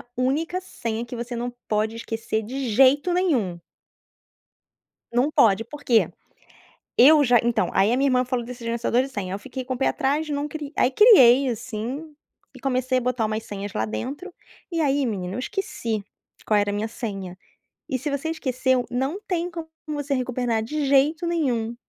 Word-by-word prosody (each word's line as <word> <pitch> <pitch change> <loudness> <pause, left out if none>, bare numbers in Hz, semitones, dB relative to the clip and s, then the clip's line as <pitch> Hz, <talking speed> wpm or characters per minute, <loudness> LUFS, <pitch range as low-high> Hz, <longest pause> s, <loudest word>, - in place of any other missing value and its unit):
a - - -13
única 305 +8 0
senha, 230 -10 -4
que 240 +1 -7
você 240 +1 -5
não 240 +1 -3 0.2
pode 215 +1 0
esquecer 225 -1 -3
de 260 +4 -4
jeito 270 - +4
nenhum. 255 - 0 1.5
Não 255 +5 +2
pode, 220 -5 +4
por 290 +5 -11
quê? 230 -3 +4 0.9
Eu 295 +4 +7
já 245 -2 +5
então 235 -2 +1
aí 200 +3 +3
a 245 - +2
minha 275 +1 +2
irmã 255 -1 +2
falou 250 -2 -2
desse 245 0 -9
gerenciador 235 +1 +1
de 270 - -4
senha, 195 -7 -4
eu 195 - -4
fiquei 260 +3 -6
com 260 - -2
um - - -4
pé 270 - +1
atrás 295 +3 0
não 290 0 -2
cri 295 -2 -7
aí 250 - +3
criei, 270 - +7
assim, 245 +6 -5 0.4
e - - -13
comecei 255 -1 0
a - - 0
botar 245 -2 0
umas 215 +1 -2
senhas 200 0 -6
lá 110 - 0
dentro. 275 - -5 0.4
E 335 -1 0
aí 280 -2 +2
menino, 190 -5 -3
eu - - -3
esqueci 245 - -3 0.4
qual 210 -1 +3
era 205 0 +1
a - - -4
minha 210 +2 -1
senha 195 -6 -6 0.5
e, 260 -3 -1
se 290 +5 -3
você 280 +3 -2
esqueceu, 260 -4 0
não 265 +9 -2
tem 350 -1 -1
como 330 -1 -6 0.2
você 290 -2 -2
recuperar 245 -3 -1
de 295 +6 -2
jeito 290 +5 +3
nenhum. 245 -9 -1
255 Hz, 185 wpm, -24 LUFS, 225-285 Hz, 1.5 s, Eu